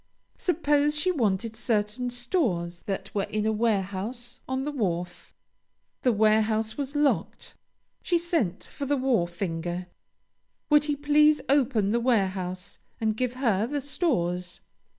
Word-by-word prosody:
Suppose 295 -3 +2
she 365 +4 +2
wanted 225 - 0
certain 220 +2 -1
stores 240 - -1
that 195 - -4
were 200 -1 0
in 215 0 -2
a 220 - +2
warehouse 220 +2 -2
on 260 0 -1
the 295 - -2
wharf. 180 -9 -3 0.7
The 250 - +3
warehouse 220 0 +2
was 285 0 -4
locked. 290 -1 0 0.5
She 350 - +2
sent 330 - -1
for 280 - -6
the 285 +1 +2
wharfinger. 175 -7 -1 0.9
Would 295 0 +6
he 295 -1 0
please 295 +1 +4
open 250 -7 +2
the 235 - +2
warehouse 190 -6 -1 0.2
and 220 -1 0
give 250 +1 -1
her 225 -5 +1
the 290 +3 -2
stores? 185 - -1
230 Hz, 130 wpm, -27 LUFS, 195-285 Hz, 0.9 s, Would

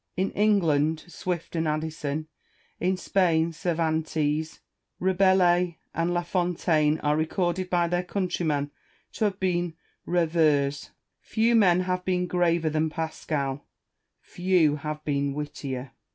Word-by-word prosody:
In 190 +2 0
England 160 -7 +2
Swift 175 -1 -4
and 160 -1 0
Addison, 155 -1 -2 0.5
in 185 +1 +1
Spain 170 -3 +1
Cervantes. 160 -2 -1 0.4
Rabelais 180 -2 +3 0.2
and 170 +1 0
La 175 0 0
Fontaine 170 -3 +1
are 150 0 +2
recorded 175 +3 -1
by 175 -1 +2
their 175 +1 0
countrymen 170 -6 -1 0.4
to 220 - -1
have 200 -1 -1
been 175 -3 0 0.3
reveurs. 155 -5 +1 0.3
Few 230 +1 +1
men 185 -6 +5
have 180 0 -2
been 180 -1 0
graver 170 -3 +1
than 155 +1 +1
Pascal] 150 -3 -3 0.5
few 175 -5 +1
have 150 +1 -6
been 140 -1 0
wittier. 140 -3 -5
165 Hz, 120 wpm, -26 LUFS, 155-180 Hz, 0.5 s, men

